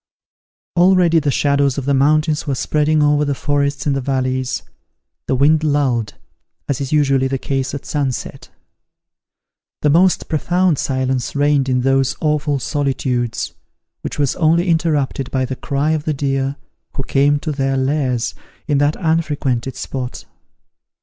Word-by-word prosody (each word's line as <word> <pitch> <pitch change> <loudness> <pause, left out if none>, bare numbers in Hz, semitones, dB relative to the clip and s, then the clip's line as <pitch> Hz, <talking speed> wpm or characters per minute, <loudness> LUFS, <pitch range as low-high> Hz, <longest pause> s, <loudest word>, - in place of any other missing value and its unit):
Already 175 -2 +4
the 150 -2 -1
shadows 140 0 +1
of 140 - -3
the 140 - +1
mountains 150 +3 +2
were 140 - 0
spreading 150 +3 +1
over 150 0 +3
the 140 -1 -1
forests 140 0 -1
in 145 - +1
the 135 - -1
valleys. 130 -1 -1 0.6
The 130 - +1
wind 150 +4 +3
lulled, 135 -7 0 0.5
as 140 -1 -2
is 135 - -4
usually 135 -3 +2
the 135 0 -1
case 135 +1 -2
at 140 - -7
sunset. 140 -4 -3 1.3
The 150 - +4
most 180 +4 +3
profound 175 0 +1
silence 130 -1 -1
reigned 145 -1 +2
in 125 -1 +1
those 135 +1 +2
awful 150 -2 0
solitudes, 130 -4 -2 0.5
which - - -5
was 145 -3 0
only 170 +2 +2
interrupted 150 -5 0
by 130 -1 0
the 130 0 -4
cry 140 +3 -1
of 155 -1 -1
the 155 - -1
deer, 135 0 -1 0.4
who 135 - -2
came 145 +2 +2
to 155 +2 -4
their 135 -1 -1
lairs 130 -3 0 0.3
in 145 -3 +2
that 145 +2 +2
unfrequented 145 -7 -1
spot. 125 -2 -5
140 Hz, 150 wpm, -18 LUFS, 135-150 Hz, 1.3 s, Already